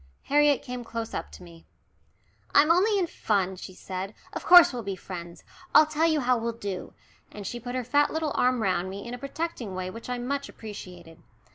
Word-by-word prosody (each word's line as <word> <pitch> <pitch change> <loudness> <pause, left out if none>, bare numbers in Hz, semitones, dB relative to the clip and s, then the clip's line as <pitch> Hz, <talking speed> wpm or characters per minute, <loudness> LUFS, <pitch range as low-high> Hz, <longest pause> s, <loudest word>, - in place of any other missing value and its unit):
Harriet 290 -1 +3
came 250 -1 -6
close 230 -1 -5
up - - -4
to - - -12
me. 170 -1 -15 0.9
"I'm 300 +3 +6
only 400 +5 +4
in 375 - +2
fun," 195 - -1
she 185 0 -10
said; 190 +3 -6 0.2
"of - - -5
course 350 -5 +8
we'll 245 - -3
be 200 -3 -4
friends. 175 -2 -9 0.3
I'll 310 - +9
tell 310 +2 +1
you 315 -2 +2
how 250 -1 +2
we'll 230 +1 -2
do," 200 -5 -6 0.4
and 205 -1 -9
she 240 - -4
put 245 +2 -6
her 255 - -1
fat 290 +5 +2
little 315 -2 -1
arm 250 -2 +2
round 185 -2 0
me 200 +4 -7
in 240 - -6
a 245 - -6
protecting 275 - -4
way 185 0 -4
which 230 +4 -9
I 250 - -1
much 275 +3 -3
appreciated. 180 -6 -10
235 Hz, 210 wpm, -27 LUFS, 190-285 Hz, 0.9 s, I'll